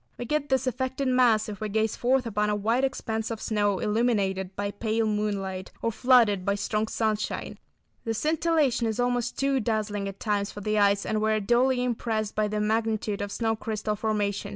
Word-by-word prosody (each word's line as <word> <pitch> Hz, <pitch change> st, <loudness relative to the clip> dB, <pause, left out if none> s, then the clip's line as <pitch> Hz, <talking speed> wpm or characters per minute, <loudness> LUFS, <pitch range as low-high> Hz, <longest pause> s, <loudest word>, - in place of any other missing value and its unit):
We 245 Hz, -, -5 dB
get 295 Hz, +3 st, -1 dB
this 265 Hz, -1 st, +2 dB
effect 260 Hz, +1 st, -2 dB
in 260 Hz, -2 st, +1 dB
mass, 230 Hz, -4 st, +4 dB
if 210 Hz, 0 st, -7 dB
we 215 Hz, -, -2 dB
gaze 220 Hz, +1 st, 0 dB
forth 255 Hz, +1 st, +1 dB
upon 210 Hz, -2 st, 0 dB
a 210 Hz, -, +1 dB
wide 225 Hz, +5 st, +1 dB
expanse 225 Hz, -4 st, -2 dB
of 225 Hz, -2 st, -4 dB
snow 205 Hz, -3 st, 0 dB
illuminated 200 Hz, -4 st, 0 dB
by 205 Hz, 0 st, -2 dB
pale 220 Hz, +2 st, -1 dB
moonlight, 200 Hz, -3 st, -2 dB
or 230 Hz, -, -1 dB
flooded 225 Hz, -4 st, +4 dB
by 200 Hz, +1 st, +1 dB
strong 210 Hz, +1 st, -1 dB
sunshine. 215 Hz, -2 st, -2 dB, 0.4 s
The 225 Hz, 0 st, -2 dB
scintillation 300 Hz, -3 st, +1 dB
is 220 Hz, +1 st, -2 dB
almost 245 Hz, -1 st, 0 dB
too 275 Hz, -1 st, +1 dB
dazzling 210 Hz, -3 st, -1 dB
at 195 Hz, 0 st, -7 dB
times 205 Hz, -2 st, -1 dB
for 205 Hz, -, -8 dB
the 215 Hz, +1 st, 0 dB
eyes, 200 Hz, 0 st, +3 dB
and 215 Hz, -1 st, -1 dB
we 220 Hz, 0 st, +2 dB
are 215 Hz, -, +2 dB
duly 245 Hz, +4 st, +2 dB
impressed 225 Hz, -3 st, -1 dB
by 215 Hz, 0 st, +1 dB
the 210 Hz, 0 st, -2 dB
magnitude 215 Hz, -1 st, 0 dB
of 205 Hz, 0 st, -4 dB
snow 225 Hz, 0 st, 0 dB
crystal 215 Hz, -1 st, -3 dB
formation. 205 Hz, -2 st, -1 dB
220 Hz, 200 wpm, -27 LUFS, 205-240 Hz, 0.4 s, mass